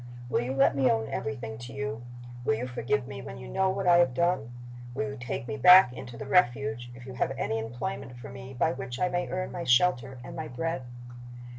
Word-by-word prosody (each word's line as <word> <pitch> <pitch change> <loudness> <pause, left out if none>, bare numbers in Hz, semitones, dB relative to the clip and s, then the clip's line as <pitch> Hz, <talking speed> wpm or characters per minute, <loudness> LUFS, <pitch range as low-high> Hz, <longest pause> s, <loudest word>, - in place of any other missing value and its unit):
"Will - - +1
you 130 +2 -3
let 135 +1 +4
me 135 -2 +3
own 110 -1 +1
everything 120 -6 -4
to 120 +1 -9
you? 140 -3 -4 0.4
Will 110 - +2
you 120 +3 -3
forgive 125 +2 -1
me 135 -1 -7
when 120 - -8
you 125 0 -9
know 190 0 +1
what 190 0 -2
I 175 -1 +7
have 150 -8 +3
done? 170 -7 +1 0.5
Will 145 - -1
you - - -6
take 125 -1 -5
me 145 - -3
back 180 -1 +8
into 125 -2 -8
the - - -6
Refuge, 140 -6 +2
if 125 0 -11
you 130 - -8
have 125 +1 -1
any 110 0 -1
employment 120 +3 -5
for 120 - -9
me 130 +1 -9
by 160 +6 +2
which 125 -3 -6
I 180 - +2
may 175 0 -1
earn 185 +1 -3
my 175 - -4
shelter 130 -2 +3
and - - -8
my 160 -1 -4
bread? 165 +4 -3
130 Hz, 230 wpm, -28 LUFS, 120-165 Hz, 0.5 s, back